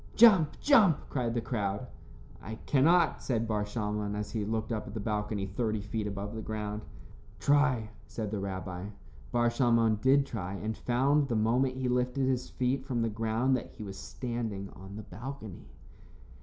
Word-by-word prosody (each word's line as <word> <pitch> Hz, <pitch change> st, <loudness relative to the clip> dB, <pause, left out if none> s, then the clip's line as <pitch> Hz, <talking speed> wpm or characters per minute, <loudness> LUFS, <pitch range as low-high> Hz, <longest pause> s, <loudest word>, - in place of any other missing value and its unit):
"Jump, 190 Hz, -10 st, +6 dB
jump," 215 Hz, -, +6 dB
cried 120 Hz, -3 st, -1 dB
the 120 Hz, -, +1 dB
crowd. 105 Hz, -1 st, -2 dB, 0.6 s
"I 110 Hz, +4 st, -6 dB
cannot," 165 Hz, +6 st, +4 dB
said 115 Hz, -3 st, 0 dB
Bar 105 Hz, -2 st, 0 dB
Shalmon, 105 Hz, -1 st, -2 dB
as 105 Hz, 0 st, -4 dB
he 110 Hz, -3 st, -1 dB
looked 110 Hz, +2 st, -2 dB
up 110 Hz, -2 st, -2 dB
at 105 Hz, -, -8 dB
the -, -, -2 dB
balcony 105 Hz, -1 st, -1 dB
thirty 110 Hz, +2 st, -1 dB
feet 105 Hz, 0 st, -3 dB
above 100 Hz, +1 st, -4 dB
the 110 Hz, -, -4 dB
ground. 105 Hz, -1 st, -4 dB, 0.6 s
"Try," 130 Hz, -4 st, +3 dB, 0.2 s
said 110 Hz, -3 st, -4 dB
the 105 Hz, -, -2 dB
rabbi. 95 Hz, -1 st, -4 dB, 0.4 s
Bar 120 Hz, 0 st, +3 dB
Shalmon 115 Hz, -3 st, +3 dB
did 135 Hz, +1 st, +5 dB
try, 100 Hz, -7 st, -4 dB
and 110 Hz, +3 st, -3 dB
found, 135 Hz, +6 st, +2 dB
the 120 Hz, -, -1 dB
moment 125 Hz, +4 st, +2 dB
he 130 Hz, -1 st, -1 dB
lifted 125 Hz, +2 st, +1 dB
his 125 Hz, -1 st, 0 dB
feet 130 Hz, +1 st, 0 dB
from 125 Hz, -4 st, -1 dB
the 115 Hz, -, +1 dB
ground, 115 Hz, +4 st, +1 dB
that 125 Hz, -, -3 dB
he 110 Hz, -, -7 dB
was 100 Hz, -1 st, -7 dB
standing 115 Hz, -6 st, -4 dB
on 95 Hz, +1 st, -11 dB
the 110 Hz, -, -6 dB
balcony. 115 Hz, -, -8 dB
115 Hz, 175 wpm, -30 LUFS, 105-130 Hz, 0.6 s, Jump